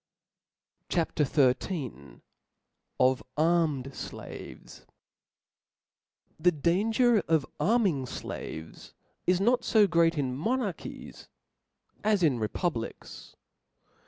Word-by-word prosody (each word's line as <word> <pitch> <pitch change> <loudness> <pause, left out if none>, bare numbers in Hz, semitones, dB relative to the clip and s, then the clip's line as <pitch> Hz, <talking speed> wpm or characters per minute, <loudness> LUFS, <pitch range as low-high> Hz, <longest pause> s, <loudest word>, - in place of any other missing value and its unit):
CHAP. 170 -2 0
XIII. 135 - 0 0.8
Of 130 0 +3 0.2
armed 160 -4 +2
Sla^oes. - - -9 1.6
TH 180 0 +5
£ 150 - -12
danger 220 +6 +3
of 160 -4 +2
arming 195 - +2
flaves 80 -8 -7 0.3
is 180 0 +3
not 240 +5 +2
fo 215 -2 +5
great 170 -3 +3
in.monarchies 170 - -3 0.8
as 210 -3 +2
in 135 -7 +3
republics. 115 +3 -4
165 Hz, 80 wpm, -28 LUFS, 135-200 Hz, 1.6 s, TH